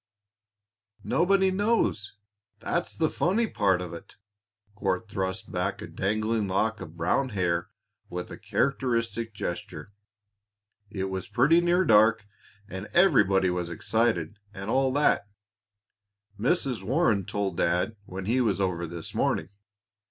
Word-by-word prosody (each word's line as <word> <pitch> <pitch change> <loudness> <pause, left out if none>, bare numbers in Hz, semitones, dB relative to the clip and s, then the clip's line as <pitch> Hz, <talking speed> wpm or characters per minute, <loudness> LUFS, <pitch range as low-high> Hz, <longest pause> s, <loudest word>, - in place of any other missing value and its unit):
"Nobody 190 +2 +3
knows; 195 - 0 0.4
that's 170 +9 -2
the 160 - +2
funny 195 +9 +1
part 100 - +1
of 85 - -7
it." 85 - -11 0.6
Court 100 +1 -2
thrust 95 -2 -4
back - - -2
a - - -6
dangling 110 +2 -1
lock 105 +3 0
of 80 +1 -9
brown 90 +11 +1
hair 90 -4 -1 0.4
with 90 0 -5
a - - -7
characteristic 115 0 -1
gesture. 85 -2 -5 1.0
"It 95 -2 -3
was 95 -1 -4
pretty 150 +8 +4
near 175 +2 +2
dark, 110 0 +5 0.4
and 95 +1 -6
everybody 105 - +4
was 90 -1 -2
excited, 105 0 0 0.2
and 100 +3 -4
all 135 0 +2
that, 145 -7 +2 1.1
Mrs. 130 - 0
Warren 115 - +2
told 95 -2 -3
Dad 90 +6 +1
when 95 0 -6
he 120 +5 +2
was 105 -5 +1
over 90 -3 -1
this 85 0 -7
morning. - - 0
105 Hz, 130 wpm, -27 LUFS, 95-130 Hz, 1.1 s, dark